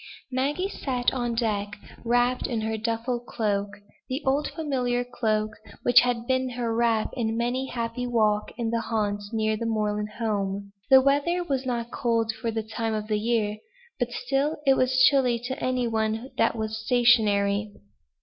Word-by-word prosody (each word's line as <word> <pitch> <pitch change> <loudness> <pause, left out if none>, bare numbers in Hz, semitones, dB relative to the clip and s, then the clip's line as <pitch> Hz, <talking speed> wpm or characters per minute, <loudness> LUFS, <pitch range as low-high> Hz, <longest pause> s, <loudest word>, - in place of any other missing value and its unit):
Maggie 285 +9 0
sat 255 -10 -1
on 240 -2 -1
deck, 215 -3 -1 0.3
wrapped 245 +1 +2
in 230 -3 -2
her 220 0 -1
duffel 230 +2 -2
cloak; 205 -4 -1 0.4
the 265 +4 -3
old 275 +2 +2
familiar 250 -6 -1
cloak, 220 -3 -1 0.3
which 245 0 +7
had 240 -1 0
been 260 0 +1
her 240 -2 -2
wrap 230 -2 +1
in 225 -2 -1
many 250 +3 -1
a - - -8
happy 235 +1 -2
walk 215 -3 +1
in 230 -2 -1
the 230 0 0
haunts 205 -2 -2
near 220 -1 +1
her 230 - -4
moorland 210 -1 -1
home. 200 -3 -2 0.2
The 265 -1 +8
weather 290 +6 +2
was 270 -5 -2
not 240 -1 -2
cold 230 -2 0
for 220 +1 -4
the 225 -1 -2
time 220 0 -3
of 215 0 -4
year, 215 -1 0 0.4
but 245 -1 0
still 275 +5 -1
it 270 - +6
was 255 0 +3
chilly 255 -4 +3
to 260 +1 -4
any 255 -1 0
one 220 +2 -1
that 230 - +2
was 220 0 -4
stationary. 215 -4 +3
235 Hz, 170 wpm, -26 LUFS, 220-250 Hz, 0.4 s, The